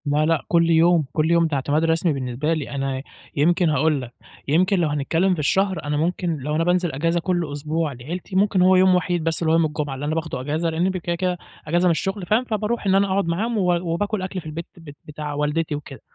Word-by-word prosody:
لا 150 +1 +2
لأ، 165 -1 +1
كُلّ 170 -1 +3
يوم، 165 -1 +4
كُلّ 160 +1 +1
يوم 170 -1 +4
ده 155 - -2
اعتماد 145 +3 0
رسمي 165 0 +2
بالنسبة 135 +3 -2
لي، 155 -4 -3
أنا 135 -1 -3 0.3
يمكن 170 +4 +3
هاقول 150 -1 +1
لك، 125 -1 -9 0.3
يمكن 185 +6 +2
لو 170 - +2
هنتكلّم 165 +6 +1
في 175 - -4
الشهر، 190 +6 +1
أنا 145 0 -1
ممكن 170 +1 -1
لو 150 +2 -3
أنا 165 - +1
بانزل 175 0 +1
أجازة 165 +5 0
كُلّ 175 -3 -1
أسبوع 155 +2 -2
لعيلتي، 170 - -7
ممكن 195 -1 +3
هو 185 +1 +5
يوم 185 0 +5
وحيد 175 -2 0
بس 165 0 -1
اللي 160 -1 +1
هو - - +4
يوم 165 - +3
الجمعة، 150 -2 -3
اللي 135 +2 -5
أنا 155 +2 -1
باخده 160 -5 -3
أجازة 155 +5 -1
لأني 165 +3 0
ب 185 - -2
كده 175 -1 -2
كده 180 0 -1 0.3
أجازة 175 +3 +2
من - - +4
الشغل 195 +3 -2
فاهم، 215 +7 +2
فباروح 220 -1 -2
إن 190 - +4
أنا 200 +1 +3
أقعد 195 0 0
معاهم 215 +8 -1
و 180 -3 +2 0.2
وباكل 205 +3 -1
أكْل 185 0 -4
في - - -20
البيت 160 +2 -6
بت 150 -4 -12
بتاع 150 -1 -6
والدتي 150 +2 -1
وكده 145 -2 -9
165 Hz, 240 wpm, -22 LUFS, 150-180 Hz, 0.3 s, هو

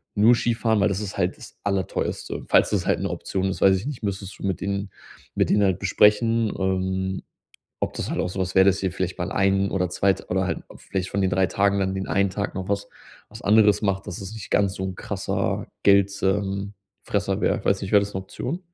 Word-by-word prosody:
nur 115 +3 +6
Skifahren, 115 -2 +1
weil 90 - +4
das 100 0 -1
ist 100 -1 -5
halt 90 0 0
das - - -13
Allerteuerste. 100 -3 -2
Falls - - +4
das - - 0
halt - - +1
'ne - - -2
Option 95 0 -3
ist, 95 - -5
weiß 95 -1 +6
ich 100 +9 -6
nicht, 140 -6 -6
müsstest 100 -1 -4
du - - -5
mit 95 -2 -1
denen 100 0 -3 0.4
mit - - +2
denen 105 - +4
halt 95 -3 +2
besprechen, 105 +3 +3
ähm, 95 0 -1 0.6
ob - - -2
das - - -4
halt - - -2
auch - - -1
so 95 - -6
was 95 0 -2
wäre, 95 - +7
dass 100 0 +2
ihr 95 - 0
vielleicht 95 0 -3
mal 90 - -3
einen 95 0 +2
oder 90 -2 0
2 95 +2 +2
oder 95 +1 0
halt 95 - -2 0.2
vielleicht 95 -1 -4
von 100 - -1
den 95 - +2
3 95 0 +2
Tagen 100 +2 +1
dann 95 0 0
den 95 0 -3
einen 100 0 +2
Tag 100 +1 -3
noch 95 -1 -4
was 100 0 -1 0.4
was - - -11
anderes 105 -1 +4
macht, 100 -1 -1
dass 85 - -5
es 95 +2 -7
nicht 110 -3 -9
ganz 100 -2 +2
so 95 - -4
'n 95 -1 -4
krasser - - -2 0.2
Geld, 100 0 +5
ähm 100 +1 0 0.3
Fresser - - -1
wäre. - - +2
Ich - - -14
weiß 100 0 +2
nicht, 95 - -5
wäre 100 - +7
das 100 0 -5
'ne 95 - -2
Option? 130 - -5
100 Hz, 235 wpm, -24 LUFS, 95-100 Hz, 0.6 s, wäre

